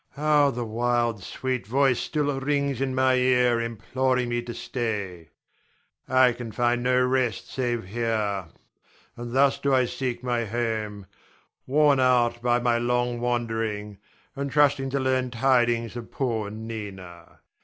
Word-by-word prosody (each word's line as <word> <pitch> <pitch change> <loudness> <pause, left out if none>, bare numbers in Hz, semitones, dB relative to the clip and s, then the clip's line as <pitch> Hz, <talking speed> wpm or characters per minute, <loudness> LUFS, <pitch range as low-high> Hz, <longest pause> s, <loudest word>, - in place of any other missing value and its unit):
How 150 0 +3
the 120 -2 -3
wild, 120 -1 0
sweet 130 -4 -3
voice 135 +1 +2
still 145 -3 -1
rings 140 -1 -1
in 130 -1 -1
my 130 0 +3
ear 125 -2 +3
imploring 125 +2 -1
me 120 0 -1
to 120 0 -7
stay. 100 - -4 0.8
I 130 -1 +5
can 120 -1 -7
find 120 +1 +1
no 125 +1 +2
rest 125 -5 -1
save 120 -4 -2
here; 105 -3 -2 0.7
and 120 0 -7
thus 135 +2 +3
do 140 -1 +2
I 130 -1 +3
seek 125 -1 -4
my 120 -2 0
home, 110 -3 -3 0.6
worn 145 0 +4
out 120 -2 +2
by 120 0 +2
my 120 -1 +1
long 120 0 0
wandering, 115 -4 -2 0.4
and 140 0 -3
trusting 140 -2 +3
to 140 +1 -1
learn 130 -1 0
tidings 120 -2 +1
of 120 -1 -7
poor 115 -6 -2
Nina. 100 -6 -8
120 Hz, 145 wpm, -25 LUFS, 115-130 Hz, 0.8 s, I